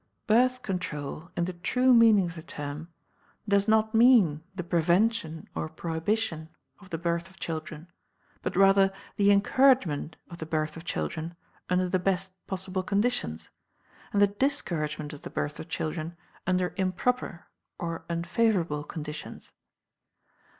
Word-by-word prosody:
Birth 255 +3 +3
Control, 165 -4 -4
in 170 - +1
the 185 - -4
true 250 +9 +3
meaning 225 -5 +6
of 170 - -5
the 165 - -8
term, 150 +1 -6 0.6
does 200 0 +3
not 220 0 +3
mean 225 - +5
the 180 - -3
prevention 170 0 +1
or 155 - -3
prohibition 165 +1 -2 0.3
of 195 -2 -16
the 165 - -3
birth 170 +1 -2
of 190 - -20
children, 155 -1 -5 0.6
but - - -3
rather 195 0 +5 0.3
the 200 0 +4
encouragement 200 - +3
of 170 -1 -11
the 160 - -5
birth 155 -1 -1
of 165 +1 -10
children 165 0 -3 0.3
under 180 0 +2
the 185 +1 +1
best 190 +1 0 0.2
possible 190 0 -3
conditions 200 - -1 0.6
and 205 - +1
the 205 - +8
discouragement 170 - -1
of 145 - -10
the - - -7
birth 145 +1 -3
of - - -8
children 160 +2 -3 0.3
under 180 -1 +1
improper 190 +1 -1 0.3
or 165 -1 -4
unfavorable 170 -3 +1
conditions. 150 0 -7
180 Hz, 140 wpm, -28 LUFS, 160-205 Hz, 0.6 s, the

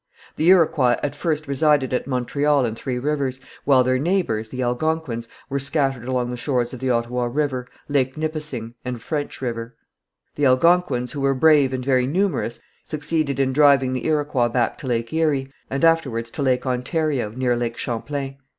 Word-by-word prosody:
The 160 - +2
Iroquois 155 -9 +5
at 145 - -2
first 155 -3 -2
resided 140 -1 +2
at 125 - -1
Montreal 140 +2 +1
and 110 -1 -3
Three 125 +1 -4
Rivers, 135 -1 -1 0.3
while 135 -2 +5
their 130 0 +1
neighbours, 145 - 0
the 130 +1 -3
Algonquins, 125 -1 -1 0.2
were 140 0 -2
scattered 135 -3 0
along 125 -1 -1
the 125 - -4
shores 125 -2 -1
of 130 - -7
the 130 +1 -2
Ottawa 120 +1 0
River, 130 -1 -1 0.2
Lake 135 -2 0
Nipissing 150 -7 -4
and 125 -1 -4
French 145 0 -4
River. 115 -1 -4 0.6
The 145 -1 +2
Algonquins, 130 -2 +3
who 145 - -4
were 135 0 +2
brave 145 -1 +5
and 130 -1 -3
very 130 -2 +2
numerous, 165 -7 -1 0.2
succeeded 155 -2 -1
in 130 -1 +1
driving 140 -2 +4
the 130 - -2
Iroquois 145 -6 +1
back 120 -1 0
to 135 - -6
Lake 115 +2 -1
Erie, 145 -4 0 0.2
and 135 +5 +1
afterwards 130 -9 +1
to - - -5
Lake 130 -2 +1
Ontario, 130 0 -1
near 125 +2 0
Lake 120 -1 -3
Champlain. 135 +3 -4
135 Hz, 175 wpm, -22 LUFS, 125-150 Hz, 0.6 s, Iroquois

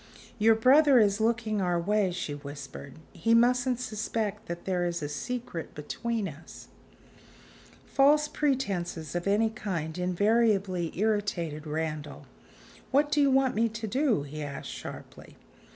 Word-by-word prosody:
"Your 220 +1 +5
brother 270 +4 +6
is 210 -2 +3
looking 220 -2 0
our 175 -2 +1
way," 205 +2 +1
she 175 -4 -4
whispered: 140 -1 -9 0.2
"he 230 0 +2
mustn't 245 +1 +3
suspect 215 -2 -3
that 170 0 -6
there 180 -2 0
is 175 -2 -3
a - - -1
secret 165 - -5
between 220 +8 -3
us." 155 0 -11 1.2
False 295 +2 +4
pretenses 195 - -2
of 175 +2 -2
any 215 +2 +2
kind 175 -6 -4
invariably 195 -1 +1
irritated 195 -8 -1
Randal. 155 -1 -4 0.6
"What 290 +2 +2
do 295 - +3
you 280 - +4
want 265 -1 +3
me 230 +1 +1
to 220 +1 -6
do?" 245 - +1
he 150 +2 -7
asked 145 -2 -6
sharply. - - -10
205 Hz, 135 wpm, -28 LUFS, 170-235 Hz, 1.2 s, brother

